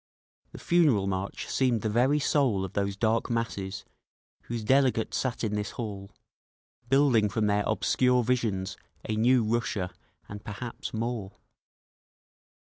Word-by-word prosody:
The - - -10
Funeral 150 - +3
March 95 0 -3
seemed 125 -5 +1
the - - 0
very 125 +7 +3
soul 135 -9 +1
of 95 - -9
those 100 -1 -1
dark 115 +3 +1
masses 105 -4 -3 0.6
whose 115 -2 -4
delegates 130 -1 +2
sat 125 -3 -2
in 105 -2 -1
this 105 -1 -2
hall, 100 -4 -5 0.8
building 130 -6 +4
from 105 +2 0
their 105 0 +2
obscure 125 -1 +2
visions 105 -6 -1 0.3
a 110 - -1
new 120 +2 +4
Russia—and 105 -2 -4
perhaps 105 +3 -6
more. 115 -3 -3
110 Hz, 130 wpm, -28 LUFS, 100-125 Hz, 0.8 s, building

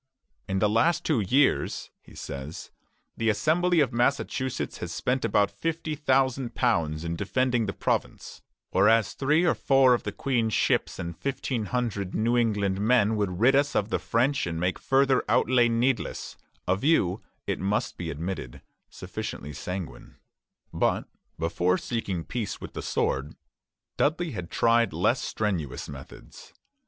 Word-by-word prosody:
"In 95 - -1
the 105 - +3
last 115 +11 +2
two 150 -7 +2
years," 130 +8 +1
he - - -17
says, 70 +3 -7 0.5
"the 115 -1 +1
Assembly 160 - +2
of 135 -3 +1
Massachusetts 130 +1 -1
has - - -5
spent 130 +1 -1
about 100 - +2
£50,000 130 - 0
in 85 0 -2
defending 120 +4 0
the 95 - -2
Province, - - -3 0.3
whereas 105 +2 +4
three 150 +5 +2
or 170 - +4
four 135 -2 +4
of 120 - +1
the 105 - -4
Queen's 115 -2 0
ships - - +1
and 85 -1 -5
fifteen 130 -3 -3
hundred 105 -5 -2
New 115 +3 +1
England 100 -5 +1
men 110 -1 +3
would 95 -4 -2
rid 130 +4 +5
us 140 0 +2
of 105 - +1
the - - 0
French 130 +1 +1
and 80 -1 -3
make 90 +2 -1
further 135 -1 +3
outlay 120 -1 +4
needless," 120 +2 -1 0.3
a 95 - +3
view, 100 - +2 0.2
it - - -2
must 100 +3 -1
be 85 -2 -5
admitted, 80 -5 -5 0.3
sufficiently 75 +2 -6
sanguine. 90 -6 -6 0.6
But - - 0 0.3
before 85 +3 +1
seeking 100 -7 -3
peace 110 -2 -4
with - - -9
the - - -5
sword, 70 +3 -1 0.6
Dudley 160 +1 +1 0.2
tried 115 -2 +2
less - - +1
strenuous 90 -11 -2
methods. 65 -2 -12
115 Hz, 145 wpm, -27 LUFS, 95-130 Hz, 0.6 s, rid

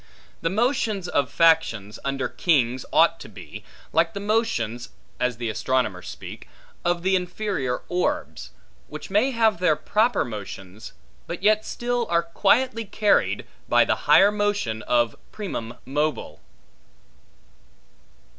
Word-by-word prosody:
The 165 - 0
motions 215 -2 0
of 145 -5 0
factions 155 -11 +2
under 135 -1 -1
kings 130 -7 +1
ought - - +4
to - - -10
be, - - -11 0.3
like 165 +6 +2
the - - -3
motions 200 - -1 0.3
(as 125 -2 0
the 120 -1 -3
astronomers 110 -3 -1
speak) - - -10 0.3
of 175 0 0
the 190 +1 +3
inferior 180 -8 -2
orbs, 180 0 -2 0.4
which - - -9
may 215 +7 +3
have 225 -6 +2
their 180 -4 +3
proper 220 +9 +1
motions, 100 -2 -8 0.3
but 175 +2 -6
yet 215 +1 +4
still 240 -1 -2
are 170 0 +2
quietly 230 +7 +1
carried, 210 +1 +1 0.2
by - - +5
the - - +1
higher 200 +1 +7
motion 205 - -1
of 120 0 +1 0.2
primum 120 - -5
mobile. 140 - -2
170 Hz, 125 wpm, -24 LUFS, -, 0.4 s, higher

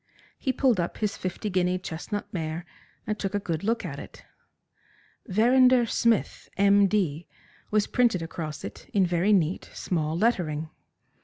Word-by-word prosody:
He 265 - 0
pulled 255 -5 +2
up 170 - -2
his 210 -2 -1
fifty 185 +3 -4
guinea 180 0 +1
chestnut 185 +3 -5
mare 165 0 -3 0.4
and 215 -1 -3
took 195 0 -2
a - - +2
good 170 -4 -3
look 230 +3 0
at - - -5
it. - - -12 1.0
"Verrinder 245 +4 +5
Smith, 230 -1 0
M. 200 0 +5
D.," 175 -6 -1 0.4
was 210 -1 +2
printed 230 -9 +2
across 160 -2 -6
it 100 - -9
in 195 -2 +4
very 175 +3 +1
neat, 180 -3 +1
small 160 -2 -1
lettering. 165 -8 0
190 Hz, 150 wpm, -26 LUFS, 170-215 Hz, 1.0 s, Verrinder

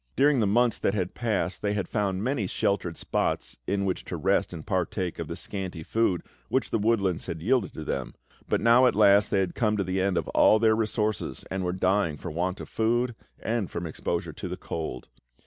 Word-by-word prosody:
During 140 0 +4
the 105 - +2
months 120 +3 +3
that 100 - +1
had 95 -3 -1
passed 105 -6 -1
they 105 0 0
had 100 -4 -2
found 100 -3 -1
many 125 -5 0
sheltered 90 -3 -1
spots - - -2
in 100 0 0
which 95 - -1
to - - -4
rest - - +1
and 80 -3 -8
partake 90 0 -1
of - - -3
the - - -5
scanty 95 -5 -5
food 100 -3 +1 0.3
which 130 - 0
the 115 - +1
woodlands 100 -5 +1
had 80 - -4
yielded 120 -1 +2
to 80 - -5
them; 65 -5 -3 0.3
but - - +1
now, 120 +2 +6
at - - +2
last, 100 -1 +5
they 95 - +2
had 90 -2 -2
come 105 -2 +1
to 100 - +1
the 95 +1 -1
end 95 -2 +1
of - - -1
all 110 - +5
their 110 0 +4
resources 110 -2 -1
and 95 0 -2
were 90 - 0
dying 95 -3 +1
for 85 - -6
want 90 +4 -2
of - - -7
food 120 +2 +1 0.3
and 115 -5 -1
from 85 - -4
exposure 80 - -3
to - - -6
the - - -5
cold. 80 -6 -5
100 Hz, 215 wpm, -27 LUFS, 90-110 Hz, 0.3 s, now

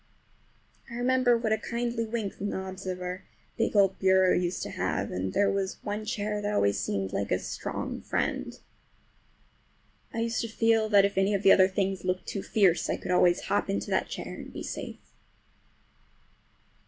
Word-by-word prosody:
I 235 - -7
remember 245 0 +3
what 230 -2 -1
a 220 - 0
kindly 235 0 -2
wink 220 -3 -4
the 200 - -3
knobs 190 -1 -5
of 185 0 -3
our 180 +1 -5 0.3
big 225 -1 0
old 195 -2 +4
bureau 190 -1 +4
used 180 0 -1
to - - -5
have, - - -2
and 95 +1 -2
there 200 - +2
was 195 -1 -2
one 210 +1 -3
chair 210 -2 -2
that 205 0 -1
always 100 - +2
seemed 95 -2 -2
like 100 - -1
a 90 - +2
strong - - -5
friend. - - -2 1.5
I 230 - -3
used 230 0 0
to 230 - -3
feel 225 -1 +2
that 200 -2 +6
if 200 -1 0
any 195 +2 +2
of 200 - -2
the 195 - +7
other 185 -1 +7
things 190 -1 -1
looked 185 0 -1
too 195 - -4
fierce 190 -5 +2
I - - 0
could - - -5
always 180 -1 +4
hop 200 - -1
into 100 +1 -2
that - - +1
chair - - -6
and - - -9
be - - -7
safe. - - -7
195 Hz, 185 wpm, -28 LUFS, 185-220 Hz, 1.5 s, the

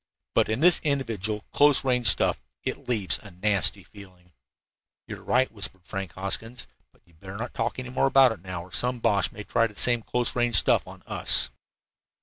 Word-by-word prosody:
But - - +2
in 110 +5 -1
this 175 +1 +5
individual 110 -8 -2
close 145 -1 +3
range 125 -3 +2
stuff - - +3 0.2
it - - -5
leaves 105 -6 -1
a 105 - -12
nasty 100 +1 0
feeling." 90 -4 -17 0.7
"You - - -7
are - - -18
right," 130 +1 +1
whispered 95 -4 -3
Frank 95 -4 -6
Hoskins, 110 - -4 0.3
"but - - -31
you'd 85 -2 -27
better 95 +2 -9
not 120 +3 -6
talk 115 +1 -3
any 130 0 -6
more 130 +2 +1
about 135 -2 +5
it 105 -6 -8
now 90 -2 -6
or 90 - -16
some 125 +1 0
Boche 100 -5 +1
may 105 - -9
try 115 +2 +1
the 105 - -17
same 120 +2 +2
close 120 +2 -2
range 120 -2 +1
stuff - - +3
on - - -13
us." - - +3
110 Hz, 195 wpm, -25 LUFS, 95-125 Hz, 0.7 s, this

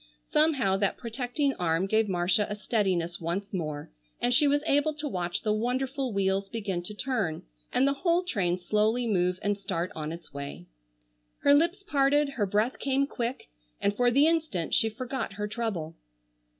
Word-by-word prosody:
Somehow 270 -11 +3
that 200 0 0
protecting 250 +4 -1
arm 165 +1 +1
gave 220 +1 +2
Marcia 180 +3 +2
a 210 - -2
steadiness 185 -6 -1
once 180 +5 -3
more 155 - -4 0.3
and 245 - +2
she 295 +3 +5
was 290 +1 +2
able 290 +1 +2
to 295 0 -4
watch 180 -8 -2
the 215 - +2
wonderful 255 +4 -1
wheels 195 -1 0
begin 200 -6 -3
to 210 +4 -8
turn 210 -10 -1 0.3
and 270 - +3
the 280 - +3
whole 340 +4 +1
train 190 - 0
slowly 215 +6 +1
move 180 -4 +1
and 205 0 +1
start 185 -3 -2
on 155 0 -4
its 165 0 -10
way. 140 -11 -7 0.8
Her 285 - +6
lips 340 +7 +2
parted, 290 -4 +3
her 225 -7 -1
breath 210 +6 0
came 275 0 +1
quick, 245 -2 -4 0.3
and 200 - +1
for 245 +2 +3
the 275 +5 +5
instant 315 - 0
she 225 - +3
forgot 245 -1 -4
her 210 +1 -3
trouble. 205 -8 -3
215 Hz, 175 wpm, -28 LUFS, 185-270 Hz, 0.8 s, Her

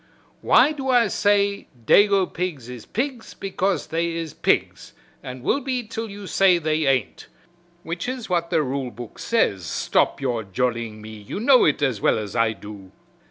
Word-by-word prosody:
"Why 300 - +5
do 270 -3 -4
I 245 -2 +5
say 200 0 +1 0.2
dago 200 - +5
pigs 165 -10 -5
is 125 -3 -9
pigs 250 0 -4
because 195 -3 -1
they 165 +1 -2
is 165 -3 -5
pigs - - -1 0.3
and 125 -1 -8
will 275 - +1
be 255 -2 -3
til 225 0 -6
you 200 0 -9
say 185 +2 +4
they 155 -2 0
ain't 135 -2 -1 0.6
which 170 +7 -4
is 255 -3 -5
what 170 -2 -1
the 155 - +2
rule 135 -1 -3
book 120 0 -10
says 100 - +1
stop 85 - 0
your 125 -4 -1
jollying 110 +1 -3
me 110 - -9
you 105 - -7
know 255 +3 +5
it 150 0 +1
as 125 -7 0
well - - +3
as 105 -1 -5
I 115 -1 +2
do. 105 -3 -11
165 Hz, 175 wpm, -23 LUFS, 120-205 Hz, 0.6 s, Why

